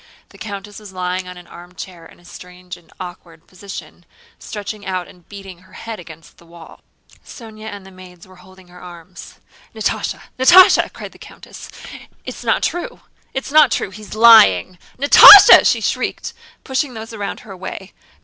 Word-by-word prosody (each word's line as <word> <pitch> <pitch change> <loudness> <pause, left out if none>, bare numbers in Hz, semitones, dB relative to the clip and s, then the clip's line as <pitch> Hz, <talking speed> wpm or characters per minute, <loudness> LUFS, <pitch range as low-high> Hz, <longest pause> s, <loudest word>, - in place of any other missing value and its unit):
The - - -20
countess 205 -1 -10
was 210 -2 -14
lying 180 0 -5
in 180 0 -11
an 180 - -15
armchair 175 -1 -13
in - - -21
a 175 - -24
strange 180 0 -13
and 175 -2 -23
awkward 175 -3 -12
position, 185 -1 -13 0.4
stretching 210 0 -9
out 185 -2 -5
and 175 -2 -21
beating 195 -3 -13
her 185 - -24
head 225 -2 -10
against 165 -2 -16
the 170 - -21
wall. 170 -1 -17 0.4
Sónya 220 -3 -14
and 205 -2 -10
the 190 - -15
maids 185 -2 -17
were 185 0 -19
holding 185 0 -20
her 180 0 -17
arms. 175 0 -14 0.4
"Natásha! - - -4 0.2
Natásha!..." 360 +8 +5
cried - - -11
the - - -21
countess. - - -14 0.6
"It's - - -10
not - - -1
true... 415 +8 -5 0.3
it's 265 +1 -6
not 310 0 +4
true... - - -3
He's 210 +1 -12
lying... 185 - +4 0.2
Natásha!" 285 +8 +8
she - - 0
shrieked, - - -4 0.3
pushing 265 -1 -4
those 225 +1 -10
around 205 -2 -7
her 210 - -15
away. 190 +1 -10
185 Hz, 170 wpm, -16 LUFS, 180-215 Hz, 0.6 s, Natásha